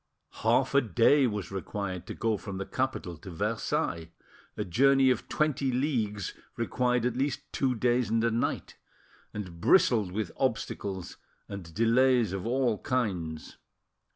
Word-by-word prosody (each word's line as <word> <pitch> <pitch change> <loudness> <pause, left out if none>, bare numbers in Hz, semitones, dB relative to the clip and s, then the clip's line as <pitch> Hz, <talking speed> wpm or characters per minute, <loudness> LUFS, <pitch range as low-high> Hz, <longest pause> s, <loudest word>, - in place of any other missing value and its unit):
Half - - +2
a 140 - +6
day 125 - +4
was 105 -4 -4
required 95 -1 -4
to - - -6
go 115 -2 0
from 100 -1 -6
the 95 - -3
capital 130 -10 -3
to 95 +5 -11
Versailles; 90 -4 -2 0.5
a - - -2
journey 135 +7 +4
of 125 - -2
twenty 145 -3 0
leagues 120 - -1 0.2
required 125 +1 0
at 125 -1 0
least 135 0 -1
two 130 -2 +1
days 120 +1 +1
and 115 0 +1
a 115 - +2
night, 115 +2 -2 0.5
and 90 -5 -7
bristled 110 - +4
with 105 -1 -3
obstacles 95 -3 -2 0.3
ind 90 -5 -8
delays 120 -1 +3
of 95 +2 -3
all 125 -3 +1
kinds. 90 -11 -2
115 Hz, 145 wpm, -29 LUFS, 95-125 Hz, 0.5 s, a